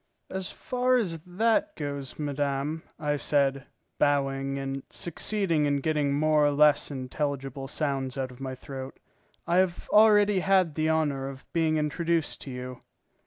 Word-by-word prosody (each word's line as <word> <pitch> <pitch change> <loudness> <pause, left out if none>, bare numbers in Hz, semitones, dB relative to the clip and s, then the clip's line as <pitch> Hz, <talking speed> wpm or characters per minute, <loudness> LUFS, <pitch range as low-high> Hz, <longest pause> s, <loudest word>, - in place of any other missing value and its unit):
"As 190 -1 -2
far 255 0 0
as 180 -10 0
that 220 +6 +1
goes, 140 -3 -5
madame," 145 +1 -2 0.2
I 150 -2 -1
said, 140 -1 +1 0.3
bowing, 135 -1 +1
and 135 0 -3
succeeding 170 -2 0
in 145 - +2
getting 150 -1 0
more 155 0 +3
or - - +2
less 150 0 +4
intelligible 135 0 -4
sounds 135 -3 -2
out 130 -1 -2
of 125 +1 -14
my 130 -1 -4
throat, 130 0 -8 0.5
"I 175 +1 +1
have 185 -2 +1
already 210 -2 +6
had 185 -3 +3
the 155 +1 0
honour 145 -4 0
of 135 -1 -11
being 160 -2 +2
introduced 165 +2 0
to - - -7
you." 125 -1 -6
145 Hz, 150 wpm, -27 LUFS, 135-170 Hz, 0.5 s, already